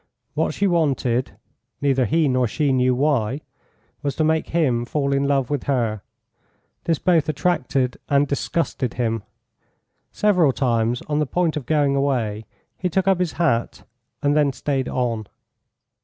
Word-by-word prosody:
What - - -1
she 200 - +1
wanted 135 -8 +1 0.5
neither 135 -3 +2
he 160 +2 +2
nor 130 -2 +2
she 145 +3 0
knew 125 0 +3
why 135 -1 +1 0.6
was 140 -3 -2
to 155 - +1
make 160 0 +1
him 135 -8 +1
fall 140 +2 -1
in 140 0 +1
love 140 -2 +1
with 145 -3 -2
her. 115 -6 0 0.8
This 165 -2 +1
both 165 -3 +2
attracted 140 -5 0
and 140 0 +3
disgusted 140 -2 -2
him. 115 -2 -1 0.9
Several 180 -9 +3
times, 120 -2 0
on 150 -1 -1
the 150 - 0
point 175 +1 0
of 150 -4 -5
going 145 -3 +2
away, 120 -6 -1 0.3
he 180 - 0
took 190 +3 0
up 190 -2 +3
his 180 -3 -1
hat, 145 -9 0 0.4
and 145 +1 +3
then 145 -2 +3
stayed 135 -1 -2
on. 115 -4 -2
140 Hz, 155 wpm, -22 LUFS, 125-155 Hz, 0.9 s, knew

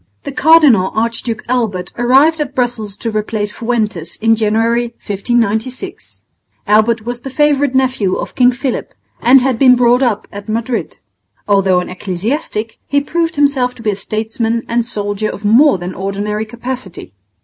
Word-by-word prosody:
The - - -5
Cardinal 275 - +5
Archduke 230 0 -2
Albert 220 -8 -2
arrived 270 +7 +3
at 280 -2 -4
Brussels 230 -5 -2
to 230 - -4
replace 215 -1 -2
Fuentes 215 -8 -2
in 225 0 +2
January, 230 +2 0
1596. 235 - -2 0.4
Albert 215 +2 +2
was 240 0 -5
the 270 - -6
favourite 285 -1 +1
nephew 255 -8 +1
of - - -5
King 250 -1 +4
Philip, 255 +1 -4 0.3
and 260 +2 +6
had 255 -3 0
been 255 -2 +6
brought 245 +1 +3
up 235 -5 0
at 200 +2 -9
Madrid. 230 +2 -3 0.5
Although 195 -3 +3
an - - -7
ecclesiastic, 210 - -3
he 285 - +2
proved 330 +3 -2
himself 275 -4 +1
to 230 - -12
be 215 - +1
a - - -3
statesman 225 +3 -2
and 235 0 0
soldier 205 -2 -3
of 210 - -7
more 240 +3 +5
than 180 +1 -6
ordinary 205 +3 -3
capacity. 235 - -7
230 Hz, 155 wpm, -15 LUFS, 210-255 Hz, 0.5 s, and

